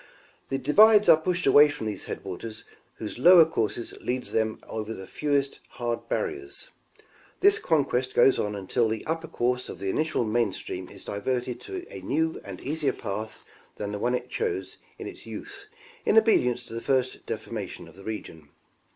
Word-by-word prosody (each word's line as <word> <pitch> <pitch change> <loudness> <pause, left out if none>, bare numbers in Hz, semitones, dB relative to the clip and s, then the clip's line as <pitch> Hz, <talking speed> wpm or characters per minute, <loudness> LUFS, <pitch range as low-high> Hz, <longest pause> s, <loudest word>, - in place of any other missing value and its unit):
'The 135 - 0
divides 210 - +6
are 165 - +10
pushed 175 +3 -1
away 145 +2 +7
from 145 - -5
those 105 -3 -4
headwaters 110 +4 -6 0.3
whose 110 +2 -6
lower 175 +3 +9
course 115 -9 -1 0.2
leads 125 +1 -2
them 110 -1 0
over 110 0 -4
the 95 - -8
fewest 140 +3 -1
hard 120 -1 -3
barriers; 390 +2 -3 0.7
this 405 +2 +5
conquest 135 -5 +1
goes 135 - +5
on 105 0 -1
until 100 +4 0
the 110 -1 -3
upper 165 +1 -2
course 125 -2 -1
of - - -7
the 95 -1 -2
initial 155 -2 0
main 115 -1 +1
stream 90 0 -6
is 100 - -11
diverted 125 +4 -2
to 370 -2 -6
a - - -7
new 160 +2 -1
and 95 -2 -8
easier 150 +1 0
path 105 +2 -6 0.3
than 105 -1 -4
the 105 - -4
one 125 +3 +1
it - - -4
chose 440 -4 -3 0.2
in - - -7
its - - -9
youth 405 0 -9 0.4
in 220 - +3
obedience 125 - +4
to - - -10
the 115 - -4
first 130 0 0
deformation - - -5
of - - -15
the 100 - -13
region. 80 -9 -7
125 Hz, 175 wpm, -27 LUFS, 110-160 Hz, 0.7 s, are